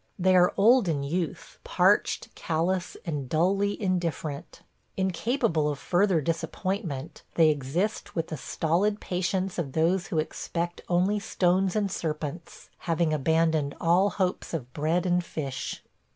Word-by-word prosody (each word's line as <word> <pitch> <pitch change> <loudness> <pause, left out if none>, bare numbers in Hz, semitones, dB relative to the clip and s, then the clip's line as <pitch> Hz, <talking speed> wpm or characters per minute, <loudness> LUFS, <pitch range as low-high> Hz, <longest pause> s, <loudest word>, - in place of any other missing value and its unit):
They 185 0 +3
are 180 0 +5
old 225 +2 +5
in 145 -4 0
youth, 165 +3 -4
parched, - - +2
callous, 180 +3 -1
and 145 -6 -3
dully 195 +6 +1
indifferent. 170 -5 -3 0.3
Incapable 190 - +1
of 145 - -3
further 180 +1 +2
disappointment, 165 - -3
they 160 -2 +6
exist 155 +9 -2
with 165 -1 -2
the 155 - -3
stolid 175 +8 0
patience 185 +1 -2
of 140 -6 -3
those 170 +3 +1
who 165 - -3
expect 170 +2 -3
only 185 +4 +2
stones 185 -1 +1
and 205 -2 0
serpents, 155 -1 -5 0.2
having 165 -1 +2
abandoned 160 0 +1
all 175 +4 +3
hopes 185 -3 -2
of 125 -5 -6
bread 160 +4 0
and 180 0 +2
fish. 140 -6 -5
175 Hz, 135 wpm, -27 LUFS, 155-190 Hz, 0.3 s, they